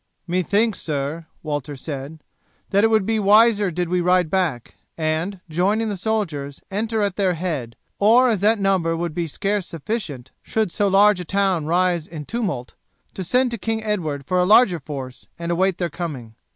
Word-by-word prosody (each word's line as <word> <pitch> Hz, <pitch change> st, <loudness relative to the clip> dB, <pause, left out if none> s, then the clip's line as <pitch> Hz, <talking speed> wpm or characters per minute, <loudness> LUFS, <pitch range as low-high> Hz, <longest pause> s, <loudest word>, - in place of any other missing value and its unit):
"Methinks, 200 Hz, +5 st, +1 dB
sir," 150 Hz, +2 st, -3 dB, 0.2 s
Walter 145 Hz, -1 st, -3 dB
said, 145 Hz, +2 st, -7 dB, 0.5 s
"that 200 Hz, +1 st, +3 dB
it -, -, +6 dB
would 220 Hz, -3 st, +2 dB
be 225 Hz, +1 st, +1 dB
wiser 210 Hz, 0 st, +5 dB
did 175 Hz, +1 st, -2 dB
we 180 Hz, +1 st, 0 dB
ride 180 Hz, -2 st, +2 dB
back, 165 Hz, -11 st, -1 dB, 0.2 s
and, 165 Hz, +4 st, -2 dB
joining 200 Hz, +7 st, +1 dB
the 205 Hz, -, -2 dB
soldiers, 170 Hz, -10 st, -2 dB
enter 220 Hz, +2 st, -1 dB
at 200 Hz, -2 st, -1 dB
their 190 Hz, -3 st, +1 dB
head, 155 Hz, -9 st, -3 dB, 0.2 s
or 235 Hz, +5 st, +5 dB
as 220 Hz, -5 st, +1 dB
that 215 Hz, +4 st, +3 dB
number 190 Hz, -5 st, +1 dB
would 170 Hz, -1 st, -3 dB
be 170 Hz, 0 st, -2 dB
scarce 200 Hz, +4 st, -2 dB
sufficient 155 Hz, -, -5 dB
should 220 Hz, -5 st, -1 dB
so 205 Hz, -, +1 dB
large 200 Hz, 0 st, +5 dB
a -, -, -3 dB
town 190 Hz, -5 st, 0 dB
rise 175 Hz, -1 st, +1 dB
in 155 Hz, -3 st, -8 dB
tumult, 185 Hz, -, -3 dB, 0.4 s
to 190 Hz, -, -5 dB
send 250 Hz, +7 st, +2 dB
to 235 Hz, -, -3 dB
King 220 Hz, +2 st, -2 dB
Edward 160 Hz, -10 st, -2 dB
for 180 Hz, +5 st, +1 dB
a -, -, +4 dB
larger 200 Hz, -2 st, +5 dB
force 135 Hz, -3 st, -8 dB
and 170 Hz, 0 st, -3 dB
await 185 Hz, +1 st, +1 dB
their 175 Hz, -3 st, -2 dB
coming. 140 Hz, -10 st, -6 dB
180 Hz, 180 wpm, -22 LUFS, 155-205 Hz, 0.5 s, it